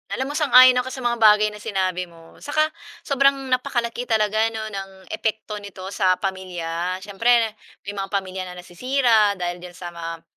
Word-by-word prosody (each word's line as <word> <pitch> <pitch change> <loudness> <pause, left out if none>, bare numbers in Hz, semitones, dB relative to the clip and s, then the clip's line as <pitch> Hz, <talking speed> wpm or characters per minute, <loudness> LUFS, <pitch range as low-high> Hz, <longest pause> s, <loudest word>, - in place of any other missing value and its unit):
Alam 265 +2 -3
mo, - - -6
sang-ayon 255 -3 +7
ka 250 - -3
sa 260 0 -6
mga 240 -1 0
bagay 215 -1 +5
na 210 - -10
sinabi 185 -4 -2
mo. 165 -1 -17
Saka 300 +2 +1 0.4
sobrang 275 -1 +3 0.2
napakalaki 245 -2 -1
talaga 215 -2 +1 0.2
‘no, 220 - -3
ng 195 -1 -5 0.2
epekto 215 -1 -3
nito 200 -2 -10
sa 190 -2 +2
pamilya. 180 -2 -3
Siyempre 205 +3 -4 0.6
may 200 - -5
mga 195 -1 -4
pamilya 190 -2 -3
na 180 - -9
nasisira 215 +3 +2
dahil 175 -1 -4
diyan 175 0 -11
sa 175 -1 -7
mga 165 -1 -7
205 Hz, 175 wpm, -22 LUFS, 185-240 Hz, 0.6 s, sang-ayon